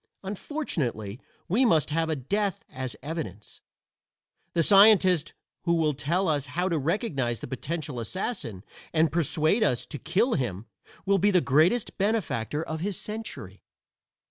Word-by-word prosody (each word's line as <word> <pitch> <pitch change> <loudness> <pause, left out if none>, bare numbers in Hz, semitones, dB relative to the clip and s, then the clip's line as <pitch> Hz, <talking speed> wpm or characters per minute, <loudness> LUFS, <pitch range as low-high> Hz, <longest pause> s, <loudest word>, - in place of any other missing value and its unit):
Unfortunately 150 - -3 0.3
we 220 +9 +3
must 160 - +3
have 165 +1 0
a 160 - +1
death 195 +8 -1
as 130 -1 -5
evidence. 140 - -6 0.9
The 165 - +3
scientist 195 -4 +6 0.3
who 170 -1 +3
will 155 -2 +2
tell 165 +7 0
us 145 -3 0
how 175 +8 -1
to 165 -3 0
recognize 140 - -1
the - - -6
potential 145 +1 -4
assassin, 115 - -4 0.3
and 160 0 +3
persuade 165 - +2
us 125 - +1
to 145 - -7
kill 190 - +1
him, 115 - -2 0.4
will 200 0 +3
be 205 +4 +4
the 185 -3 +4
greatest 165 - +2
benefactor 165 - 0
of 160 -1 -4
his 195 +2 -2
century. 220 +1 -6
165 Hz, 145 wpm, -27 LUFS, 135-195 Hz, 0.9 s, scientist